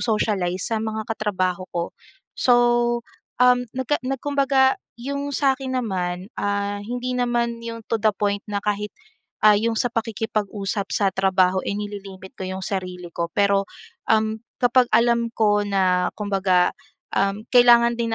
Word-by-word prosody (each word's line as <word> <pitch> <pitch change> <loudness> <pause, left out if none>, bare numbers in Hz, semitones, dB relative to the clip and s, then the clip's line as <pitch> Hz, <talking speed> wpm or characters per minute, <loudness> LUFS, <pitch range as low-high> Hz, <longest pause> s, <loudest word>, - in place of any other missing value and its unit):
socialize 195 -5 0
sa 220 - 0
mga 220 0 -3
katrabaho 185 -4 -2
ko. 170 -1 -2 0.5
So, 250 - +3 0.9
um 250 0 +4
nagka 260 +3 0
na 270 - -1
kumbaga, 270 -1 +2 0.2
yung 280 +3 -4
sa 270 -1 +2
'kin 260 -1 -4
naman, 185 -4 -2
ah, 205 0 -1
hindi 245 +4 -4
naman 240 -1 0
yung 230 0 -6
to 230 - +1
the 215 -1 +2
point 205 0 -1
na 205 -1 -3
kahit, 210 0 -2 0.5
ah, 210 -1 +6
yung 230 +1 0
sa 245 +2 0
pakikipag-usap 215 -3 -2
sa 200 -2 +2
trabaho, 190 -1 +2
eh, 200 - -1
nililimit 200 -2 -7
ko 190 - -4
yung 190 0 -5
sarili 180 -2 -4
ko. 170 0 -2
Pero, 200 -1 +2 0.4
um, 220 0 +2 0.2
kapag 245 0 +4
alam 235 0 +2
ko 205 -2 +2
na, 185 -2 +1
kumbaga, 190 -3 +2 0.4
um, 195 +2 0
kailangan 240 -1 +6
din 230 -1 -1
210 Hz, 150 wpm, -23 LUFS, 195-235 Hz, 0.9 s, ah